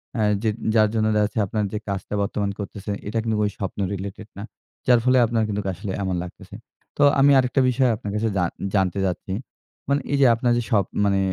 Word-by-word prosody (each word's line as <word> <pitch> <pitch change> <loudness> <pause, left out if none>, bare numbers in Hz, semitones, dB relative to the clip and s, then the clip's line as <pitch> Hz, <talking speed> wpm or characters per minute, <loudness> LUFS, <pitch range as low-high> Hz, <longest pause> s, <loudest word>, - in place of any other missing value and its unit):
অ্যা 110 - +1 0.2
যে 110 - +2 0.3
যার 110 -1 +5
জন্য 110 -1 +1
দেখাচ্ছে 105 +1 +1
আপনার 105 +2 -1
যে - - -1
কাজটা 100 +1 -4
বর্তমান 100 0 -1
করতেছেন, 100 0 -5
এটা 105 +2 -3
কিন্তু 110 -1 -1
ওই 105 - +1
স্বপ্ন 100 0 -5
রিলেটেড 100 +2 -6
না। 100 - -6 0.4
যার 125 -2 +6
ফলে 130 0 +4
আপনার 115 -1 0
কিন্তুক 105 -1 -3
আসলে 95 +3 -6
এমন 95 -1 -1
লাগতেছে। 90 - -12 0.4
তো - - +5 0.2
আমি 140 +1 +6
আরেকটা 130 +1 +2
বিষয় 125 0 +2
আপনার 105 -1 -6
কাছে 110 +1 0
জান 90 -2 +1 0.3
জানতে 95 -1 +1
চাচ্ছি; 95 +1 -3 0.6
মানে 140 +1 +2
এইযে 140 -1 +4
আপনার 120 +1 +1
যে 120 - 0
স্বপ 100 -4 +3 0.2
মানে 100 -1 +2
105 Hz, 200 wpm, -23 LUFS, 100-115 Hz, 0.6 s, যার